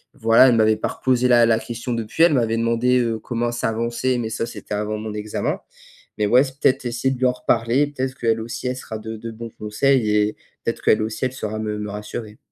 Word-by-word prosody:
voilà, 115 +3 +6
elle 120 - +3
m'avait 110 -1 +4
pas - - -1
reposé 125 -1 +1
la 120 -1 +6
la 115 -1 +3
question 120 +2 -5
depuis, 115 +7 0
elle 170 -3 +6
m'avait 115 -2 +1
demandé, 115 +2 +2
heu, 115 -2 -1
comment 120 +1 -2
ça 120 -1 -1
avançait, 120 +3 -1
mais 115 -2 -3
ça, 115 +1 -2
c'était 105 - -8
avant 105 +1 -2
mon 110 0 -5
examen 105 0 -3 0.6
mais 105 - +2
ouais, 125 +4 +6
peut-être 135 -1 0
essayer 120 +2 0
de 130 - -7
lui 130 - +2
en - - +3
reparler, 120 +3 +1
peut-être 130 -2 -4
qu'elle 115 -1 +1
aussi, 115 +3 -6
elle 125 - -1
sera 110 -4 -6
de 110 +1 -6
de 115 +2 -7
bons 115 +1 -8
conseils 110 +3 +1
et 105 0 +2 0.3
peut-être 115 - -2
qu'elle 110 - +4
aussi 110 +3 -3
elle 130 - -1
saura 110 -3 -4
me 105 -1 -3
me 105 -1 -4
rassurer. 105 +1 -7
115 Hz, 230 wpm, -22 LUFS, 110-125 Hz, 0.6 s, voilà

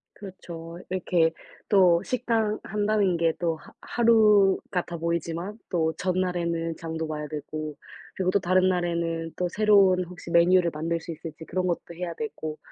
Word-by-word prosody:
그렇죠. 170 -4 -9
이렇게 175 -3 +2 0.4
또 180 -4 +5
식당 225 -3 0
한다는 205 -3 +1
게 165 -1 +2
또 165 -2 0
하 - - -16
하루 215 -4 +4
같아 175 -2 -2
보이지만 170 +4 -3
또 160 -3 +1
전날에는 175 -3 -1
장도 160 -1 -4
봐야 150 -1 -4
되고 155 0 -5 0.4
그리고 185 -1 0
또 200 - +3
다른 185 +1 +3
날에는 170 -2 -1
또 180 - 0
새로운 200 -3 +4
혹시 180 0 -11
메뉴를 170 0 +5
만들 165 +2 -2
수 165 - -7
있을지 160 0 -8
그런 185 +2 -1
것도 170 -1 -3
해야 175 0 -4
되고 160 -6 -5
175 Hz, 310 characters per minute, -26 LUFS, 165-190 Hz, 0.4 s, 또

